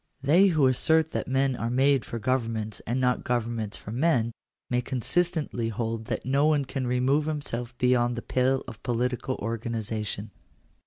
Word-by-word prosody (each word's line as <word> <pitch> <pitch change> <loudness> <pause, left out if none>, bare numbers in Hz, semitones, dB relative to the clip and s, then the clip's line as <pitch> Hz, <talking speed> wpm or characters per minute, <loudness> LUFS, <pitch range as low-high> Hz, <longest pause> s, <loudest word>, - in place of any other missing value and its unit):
They 170 +8 +6
who 155 -7 +3
assert 160 +5 +3
that - - -3
men 135 0 +1
are 115 - -2
made 135 +1 +3
for 115 - -5
governments 115 -3 -1
and 120 +3 0
not 125 -1 +1
governments 115 -3 -2
for 105 - -9
men, 120 -3 +2 0.4
may 125 0 +1
consistently 145 -1 -1
hold 115 0 -3
that - - -3
no 140 +3 +3
one 150 -3 +2
can 130 -1 -3
remove 130 +4 +2
himself 125 -5 -4
beyond 120 -1 +2
the 120 - -5
pale 130 +1 +1
of 115 -3 -9
political 125 +1 -1
organization. 110 -1 -3
125 Hz, 160 wpm, -27 LUFS, 115-135 Hz, 0.4 s, They